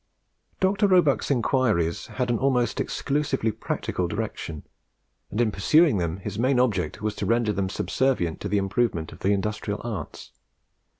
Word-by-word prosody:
Dr. 195 +2 +3
Roebuck's 180 -7 +3
inquiries 115 - +1
had 125 -1 -2
an 115 - 0
almost 125 -4 +1
exclusively 140 -5 -1
practical 95 -4 -3
direction, 95 -6 -4 0.7
and 105 - -4
in 115 -3 +3
pursuing 145 - +4
them 85 0 -2
his 100 +2 -6
main 130 +1 +3
object 115 -3 0
was 110 -1 0
to - - -2
render 115 -2 +2
them 95 -1 -1
subservient 105 -7 0
to 100 - -3
the 105 - +1
improvement 100 -4 0
of - - -12
the 95 - 0
industrial 105 +1 -1
arts. 105 -10 -6
110 Hz, 155 wpm, -25 LUFS, 100-130 Hz, 0.7 s, pursuing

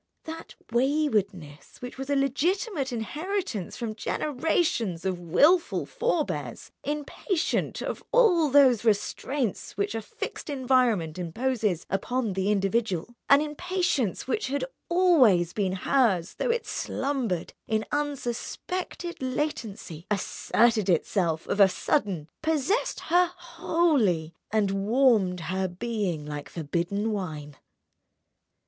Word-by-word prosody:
That 325 +1 -8 0.2
waywardness 220 - 0
which 250 +1 -8
was 270 +1 -5
a 285 - +2
legitimate 285 - 0
inheritance 290 - -3
from 230 -3 -3
generations 250 - -1
of 185 -2 -1
wilful 295 - +3
forebears, 350 -11 -2
impatient 300 +4 -2
of - - -4
all 365 -11 +5
those 260 -5 +5
restraints 230 +1 -1
which 200 - -1
a 225 - -2
fixed 215 - -7
environment 250 - +1
imposes 210 0 -1
upon 225 +3 -1
the 190 +1 0
individual, 200 0 0 0.2
an 280 +1 +7
impatience 305 - -1
which 425 +11 -1
had 285 - -1 0.2
always 260 - +4
been 195 -3 0
hers 190 -4 +1
though - - 0
it 470 0 0
slumbered 255 - -2
in 220 0 0
unsuspected 295 +5 -3
latency, 240 - -4
asserted 215 +1 +1
itself 170 -1 +1
of 200 - -2
a 195 -1 +8
sudden, 190 - -1
possessed 320 - 0
her 350 +1 +3
wholly, 325 - +1 0.2
and 210 -2 +1
warmed, 200 -3 +2
her 185 +3 -1
being 185 -4 -3
like 145 -1 -6
forbidden 175 +7 -2
wine. 155 -8 -5
235 Hz, 110 wpm, -27 LUFS, 190-295 Hz, 0.2 s, a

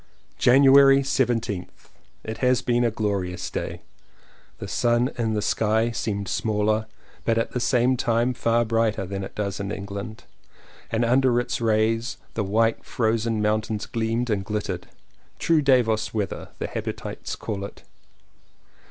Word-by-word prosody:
January 135 +1 +7
17th. 115 -8 -2 0.3
It 110 0 -6
has 125 -1 +2
been 120 0 +2
a 120 - +3
glorious 100 -5 -2
day. - - -5 0.7
The - - -7
sun 120 +1 +1
in 110 -2 -1
the 105 - -1
sky 110 +2 +1
seemed 100 -3 -3
smaller, 110 0 0 0.4
but 115 -1 +1
at 115 - 0
the 125 - -2
same 125 +1 +2
time 120 +2 +1
far 115 0 +1
brighter 115 -3 0
than 95 +1 -4
it 95 - -8
does 100 -2 -3
in 100 0 -3
England, 100 +2 -6 0.7
and 115 +1 +1
under 125 0 +3
its 120 - -3
rays 115 +1 +1 0.2
the 110 - -1
white 115 +3 +1
frozen 115 -1 0
mountains 105 0 0
gleamed 115 +1 -1
and 100 -2 0
glittered. 105 +1 -4 0.5
"True 165 -2 +2
Davos 120 -6 +2
weather," 105 -3 -3
the - - -3
habitues - - -5
call 100 -3 -5
it. 100 - -9
115 Hz, 145 wpm, -24 LUFS, 105-120 Hz, 0.7 s, January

